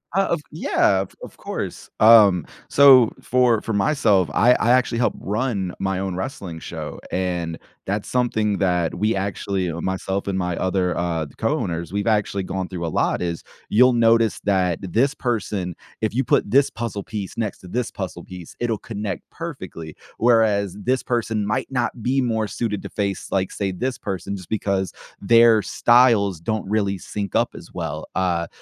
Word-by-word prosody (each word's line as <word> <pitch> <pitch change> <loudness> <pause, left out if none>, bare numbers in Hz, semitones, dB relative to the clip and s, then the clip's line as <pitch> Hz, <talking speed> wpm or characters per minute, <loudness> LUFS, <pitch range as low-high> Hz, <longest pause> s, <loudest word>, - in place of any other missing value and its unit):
Uh, 195 0 +3
of 170 - 0
Yeah, 100 - +2
of 95 - -7
of - - -10
course. - - -6
Um, 105 -7 +7 0.2
so, 130 -5 +7
for 125 -3 +2
for 115 - -3
myself, 100 - +2
I 120 +3 +5
I 120 - +2
actually 125 -1 +2
help 120 - +1
run 105 -3 -2
my 95 -1 -1
own 95 -1 -3
wrestling 95 -5 -5
show, - - -7
and 90 -3 -2 0.3
that's 100 +1 -2
something 110 -5 +1
that 90 -3 +1
we 110 +1 +1
actually 95 -1 -2
uh, 85 +1 -5
myself 95 +1 -2
and 95 -1 -1
my 90 -2 -1
other, 95 -1 0
uh 85 -2 -1
d 70 - -15
co-owners, 85 -1 -2
we've 100 0 -1
actually 105 -3 +1
gone 95 0 -3
through 90 -2 -5
a - - -2
lot - - +1
is, 85 -2 -3 0.3
you'll 125 +4 +5
notice 115 -1 +3
that 100 -2 +2 0.2
that 95 -3 -7
this 135 +5 +3
person 105 -8 -2 0.3
if 110 -1 -1
you 130 +3 +1
put 110 - +1
this 135 +5 +4
puzzle 115 -2 -4
piece 105 -2 -6
next 110 -4 -3
to - - -13
this 120 +5 -2
puzzle 90 -3 -6
piece, 90 -3 -11
it'll 120 -2 0
connect 105 -3 -5
perfectly, 80 -2 -7 0.2
whereas 110 -5 +3
this 130 +1 +1
person 115 -3 -1
might 105 +1 -1
not 125 -2 -2
be 135 +3 +1
more 110 -3 0
suited 105 -2 -3
to - - -6
face, 100 -2 -3
like, 95 -1 0
say, 100 -2 -2
this 125 +8 -3
person 95 +1 -4
just 95 -3 -10
because 100 -3 -1 0.3
their 115 +1 +6
styles 115 -7 +3
don't 110 +4 -3
really 100 -2 0
sync 100 +2 -5
up - - +3
as - - -11
well. - - -4
Uh, 85 -2 0
100 Hz, 180 wpm, -22 LUFS, 95-115 Hz, 0.3 s, Um